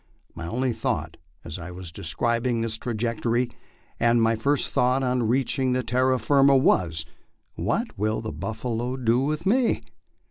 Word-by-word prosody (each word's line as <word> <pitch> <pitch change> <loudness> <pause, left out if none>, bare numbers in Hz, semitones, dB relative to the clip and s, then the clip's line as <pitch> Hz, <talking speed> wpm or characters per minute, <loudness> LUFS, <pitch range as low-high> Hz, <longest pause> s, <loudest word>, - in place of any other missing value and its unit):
My 85 0 -6
only 125 +5 0
thought, - - -2 0.3
as 85 +2 -6
I 85 +1 -7
was 90 -1 -8
describing 115 +9 -1
this 110 -1 -1
trajectory, 120 +1 -1 0.5
and 120 0 +4
my 115 0 +3
first 140 +6 +1
thought 130 +2 +2
on 125 -2 +1
reach 130 +4 +1
ing 130 -1 +1
terra 130 +3 +2
firma, 135 +3 +4
was, 85 -10 +2 0.5
"What - - -2
will 110 +1 0
the 110 - -5
buffalo 120 +3 -3
do 120 -1 +2
with 150 +3 -1
me?" 235 +4 +2
120 Hz, 150 wpm, -25 LUFS, 110-130 Hz, 0.5 s, and